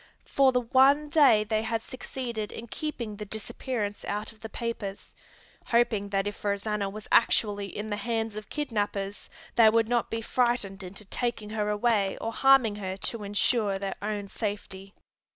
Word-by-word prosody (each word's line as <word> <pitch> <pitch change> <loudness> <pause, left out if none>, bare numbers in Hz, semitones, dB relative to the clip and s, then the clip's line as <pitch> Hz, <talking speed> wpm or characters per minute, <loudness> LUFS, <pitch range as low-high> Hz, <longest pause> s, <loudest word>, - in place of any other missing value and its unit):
For 270 -1 +4
the 250 -1 +2
one 270 +5 +4
day 275 -9 +6
they 215 0 0
had 225 0 -2
succeeded 240 -4 -5
in 230 - -7
keeping 235 -4 -4
the 210 - -5
disappearance 210 0 -4
out 210 +1 -3
of 220 - -22
the 220 - -7
papers, 215 -4 -5 0.5
hoping 225 -4 +2
that 195 0 0
if 205 0 -5
Rosanna 200 0 -1
was 210 +1 -9
actually 205 -3 +3
in 210 +3 -6
the 205 - -1
hands 225 0 -2
of 215 0 -7
kidnapers 205 -8 -3 0.3
they 225 -2 +8
would 225 0 +3
not 240 0 +1
be 225 0 -2
frightened 235 -6 0
into 195 +3 -8
taking 220 0 -3
her 210 -1 -1
away 210 -2 +1
or 225 - -3
harming 265 -6 +5
her 190 -2 -4 0.2
to 225 -3 -6
insure 205 0 +1
their 195 0 -3
own 205 -1 -3
safety. 195 -2 -5
215 Hz, 170 wpm, -28 LUFS, 205-235 Hz, 0.5 s, they